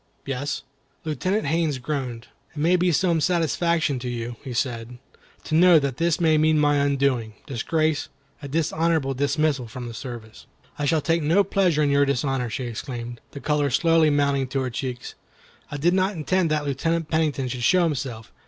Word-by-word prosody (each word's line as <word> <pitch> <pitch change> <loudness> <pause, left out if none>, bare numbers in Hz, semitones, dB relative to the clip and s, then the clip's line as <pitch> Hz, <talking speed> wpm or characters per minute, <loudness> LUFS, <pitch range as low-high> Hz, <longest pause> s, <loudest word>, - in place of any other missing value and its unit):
"Yes." 140 +1 -3 0.4
Lieutenant 185 +7 -1
Haines 155 -1 0
groaned. 125 -3 -4 0.3
"It - - -13
may 165 +5 +3
be 180 0 +2
some 170 0 +2
satisfaction 165 -3 +1
to 125 0 -4
you," 120 0 -4
he 135 - -6
said, 120 -1 -3 0.5
"to - - -6
know 175 +1 +7
that 140 -4 -1
this 170 0 +1
may 160 -2 +3
mean 155 0 +3
my 145 -1 +3
undoing, 140 -6 0
disgrace, 155 +4 -1 0.3
a 140 - -6
dishonorable 160 -1 0
dismissal 140 -1 0
from 120 +2 -7
the 115 - -7
service." 115 -1 -9 0.3
"I 145 - 0
shall 155 +2 +2
take 165 +2 +1
no 165 +7 +3
pleasure 180 -5 +2
in 145 - +2
your 140 0 +4
dishonor," 135 -2 0
she 130 - -4
exclaimed, 120 0 -6
the 140 - -9
color 150 0 0
slowly 165 +3 +3
mounting 140 -2 +1
to 135 +1 -2
her 130 -1 -2
cheeks. 125 0 -5 0.6
"I 145 - -5
did 170 +5 +2
not 190 +2 +1
intend 175 +2 0
that 155 -1 0
Lieutenant 165 +4 -1
Pennington 155 -5 0
should 125 0 -4
show 180 +8 +4
himself. 130 -8 -3
145 Hz, 180 wpm, -24 LUFS, 130-165 Hz, 0.6 s, know